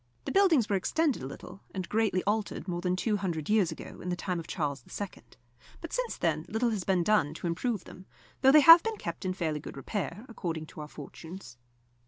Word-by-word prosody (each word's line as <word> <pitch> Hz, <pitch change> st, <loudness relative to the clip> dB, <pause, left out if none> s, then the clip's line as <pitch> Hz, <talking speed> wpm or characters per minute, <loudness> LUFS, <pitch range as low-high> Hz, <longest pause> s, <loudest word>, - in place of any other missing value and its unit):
The -, -, -2 dB
buildings 345 Hz, -, +4 dB
were 205 Hz, -, +1 dB
extended 290 Hz, -, +1 dB
a 130 Hz, -, -4 dB
little 180 Hz, +7 st, -10 dB
and 185 Hz, -2 st, -3 dB
greatly 210 Hz, -4 st, +1 dB
altered 210 Hz, -2 st, -1 dB
more 175 Hz, -1 st, -2 dB
than 180 Hz, 0 st, +1 dB
two 210 Hz, +3 st, 0 dB
hundred 175 Hz, -4 st, -2 dB
years 210 Hz, -6 st, +3 dB
ago, -, -, -9 dB
in 180 Hz, -, -5 dB
the 180 Hz, -, 0 dB
time 180 Hz, -1 st, -2 dB
of 165 Hz, -, -8 dB
Charles 145 Hz, -5 st, -2 dB, 0.2 s
II., 205 Hz, -2 st, -2 dB, 0.7 s
but 330 Hz, -, -8 dB
since -, -, -2 dB
then 155 Hz, -2 st, 0 dB
little 230 Hz, +3 st, +1 dB
has 205 Hz, -4 st, -2 dB
been 185 Hz, -2 st, +2 dB
done 170 Hz, -7 st, +2 dB
to -, -, -7 dB
improve 195 Hz, +5 st, -1 dB
them, 185 Hz, +1 st, -13 dB, 0.3 s
though 265 Hz, 0 st, +7 dB
they 305 Hz, +1 st, +8 dB
have 330 Hz, +3 st, +11 dB
been 450 Hz, +1 st, -3 dB
kept 170 Hz, +3 st, -5 dB
in 185 Hz, -, 0 dB
fairly 160 Hz, -5 st, -1 dB
good 140 Hz, -, -9 dB
repair, 190 Hz, -, -4 dB
according 165 Hz, -8 st, -4 dB
to 155 Hz, -, -10 dB
our 150 Hz, -, -6 dB
fortunes. 150 Hz, -2 st, -10 dB
185 Hz, 220 wpm, -30 LUFS, 165-220 Hz, 0.7 s, have